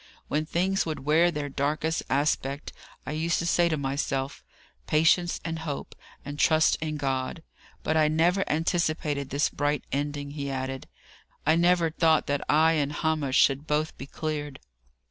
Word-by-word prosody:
"When 155 +1 -1
things 190 +4 +1
would 155 -4 -4
wear 160 +4 +4
their 150 -4 -3
darkest 150 +4 -1
aspect, 140 0 -1 0.3
I - - -4
used 160 +2 0
to 170 - -2
say 170 0 +3
to 160 - 0
myself, 135 0 -2 0.4
'Patience 170 +3 +3
and 165 -1 -3
hope; 150 -3 -5 0.3
and 145 +1 -6
trust 155 -1 +4
in 155 -1 -3
God!' 135 +3 -2 0.4
But 155 - 0
I 155 -1 +4
never 170 +5 +2
anticipated 155 -3 0
this 140 +2 +1
bright 145 -1 -1
ending," 145 +1 -3
he 140 -1 -4
added. 130 0 -4 0.6
"I 155 - +4
never 170 -1 +3
thought 160 -1 +3
that 145 0 -1
I 160 +2 +5
and 145 -3 0
Hamish 150 -3 0
should 140 +2 +3
both 150 +1 0
be 135 - -9
cleared." 150 -1 -4
150 Hz, 160 wpm, -27 LUFS, 140-160 Hz, 0.6 s, I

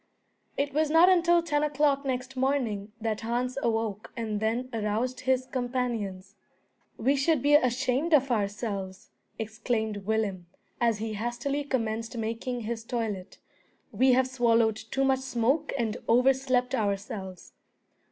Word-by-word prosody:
It 280 0 -1
was 305 +1 +2
not 330 +4 +6
until 345 -2 +4
ten 295 -3 0
o'clock 290 -1 +1
next 260 0 -3
morning 250 -6 -1
that 220 -1 -2
Hans 245 +2 -1
awoke 225 -3 -1
and 215 -3 -2
then 230 +4 -1
aroused 225 +4 -1
his 260 0 +1
companions. 240 -7 -3 0.6
"We 265 +5 +2
should 280 0 +1
be 290 +1 +4
ashamed 260 +3 +2
of 275 -2 +2
ourselves," 200 -3 -3 0.3
exclaimed 220 -1 -2
Willem, 205 -5 -1 0.3
as 230 -2 +2
he 220 +1 -4
hastily 240 +6 -2
commenced 230 -3 -2
making 230 +2 -3
his 225 0 -4
toilet. 220 -6 -4 0.5
"We 255 +5 +4
have 260 +1 +3
swallowed 230 -4 +2
too 270 +5 -2
much 265 -1 +3
smoke 265 +4 0
and 225 -4 -1
overslept 255 +1 +3
ourselves!" 200 -2 -3
240 Hz, 130 wpm, -28 LUFS, 220-265 Hz, 0.6 s, not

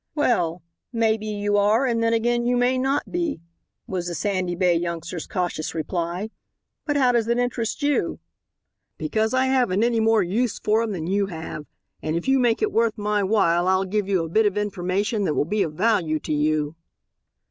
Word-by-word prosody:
"Well, 180 - +1 0.3
may 225 -2 +2
be 215 -1 -7
you 205 -1 0
are 210 +6 +3
and 235 -3 0
then 230 0 +2
again 240 +1 +1
you 245 +1 +1
may 250 +1 +2
not 270 +2 -1
be," 340 - -1 0.5
was 180 -2 -3
the 175 - -3
Sandy 185 0 -1
Bay 180 0 +3
youngster's 170 0 -3
cautious 175 -4 -3
reply; 175 +5 -3 0.6
"but 295 -1 +1
how 255 -3 +4
does 235 -2 +1
it 235 +1 +1
interest 245 +2 -2
you?" 285 -12 0 0.8
"Because 215 +8 0
I 260 0 +3
haven't 245 -7 +2
any 235 -1 +2
more 220 -2 +3
use 215 +5 -1
for 215 +1 +1
him 230 -2 -2
than 170 -5 -4
you 195 +3 0
have, 160 -4 -7 0.3
and 155 +1 -2
if 170 - -3
you 270 0 +4
make 240 - +2
it 425 - +1
worth 230 -1 +1
my 210 0 0
while 180 -4 +2
I'll 190 +1 +2
give 200 +1 -1
you 185 -4 +2
a - - -4
bit 215 +6 +3
of 205 0 -2
information 205 +1 -1
that 150 - 0
will - - +1
be 210 +5 -1
of 155 - -1
value 175 -4 +1
to - - -3
you." 150 0 0
205 Hz, 200 wpm, -23 LUFS, 175-230 Hz, 0.8 s, how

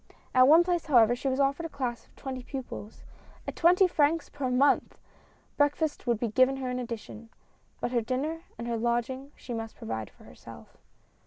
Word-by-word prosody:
At 255 0 +6
one 320 +4 +7
place, 345 -2 -1
however, 240 -5 +5
she 250 - -4
was 265 0 0
offered 280 +4 +1
a - - -19
class 245 -6 -4
of - - -29
twenty 260 -2 -6
pupils, 245 -5 -8 0.4
at - - -4
twenty 360 +3 +5
francs 320 -1 +1
per 280 -3 -3
month! 260 +3 +2 0.6
Breakfast 290 -1 0
would 235 -3 +1
be 235 - -1
given 255 +4 +3
her 260 -2 -3
in 250 - -2
addition, 230 -1 -7 0.5
but - - -2
her 240 -2 +2
dinner 275 +8 -2 0.2
and 235 +1 -6
her 235 -1 -1
lodging 240 +4 -2
she 245 - -8
must 225 -1 -5
provide 110 -1 -5
for - - -21
herself. - - -14
255 Hz, 185 wpm, -28 LUFS, 235-290 Hz, 0.6 s, one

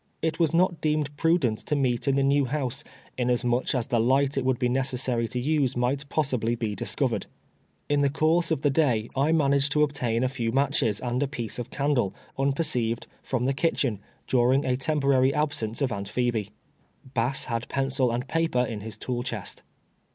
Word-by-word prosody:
It 160 +1 -1
was 165 -3 +3
not 175 0 +2
deemed 150 -2 0
prudent 150 -9 +2
to 150 - -2
meet 130 -3 0
in 135 - +3
the 140 - +2
new 140 0 +3
liouse, 135 0 -2 0.4
inasmuch 125 +1 +1
as 120 -3 0
tlie 120 -4 +1
light 135 +3 +2
it 135 - 0
wouhl 130 -1 +1
be 125 - +1
necessary 125 -2 0
to 125 - -3
nse 140 -1 +1
miglit 135 +4 -1
possibly 125 -6 0
be 115 -3 -2
disc<:)vered. - - -1 0.6
In 145 0 +2
the 140 - +3
ccmrse 160 +3 +2
of 160 -4 -1
the 145 - +3
day 125 -7 +1
I 140 +4 +2
managed 140 -2 +3
to 150 - +4
obtain 125 -5 0
a - - +3
few 120 -3 -2
matches 135 -5 +1
and 125 +1 -1
a 145 - +1
piece 120 -5 -4
of 120 0 -5
candle, 135 -9 0 0.2
unperceived, 135 -5 0 0.2
from 125 -2 -2
the 135 - +2
kitchen, 135 - 0 0.3
during 130 +2 +3
a 125 - +1
temporary 135 -1 +2
absence 145 -5 -1
of 130 - 0
Aunt 100 -1 -4
Phebe. 120 -5 -1 0.6
Bass 125 +2 +1
liad 115 -1 -3
pen 135 -1 -1
cil 130 -2 +2
and 120 +2 -2
[)aper 165 -7 +1
in 110 -2 -5
his 110 +1 -7
tool 125 -1 -3
chest. 115 -5 -5
130 Hz, 190 wpm, -26 LUFS, 120-145 Hz, 0.6 s, to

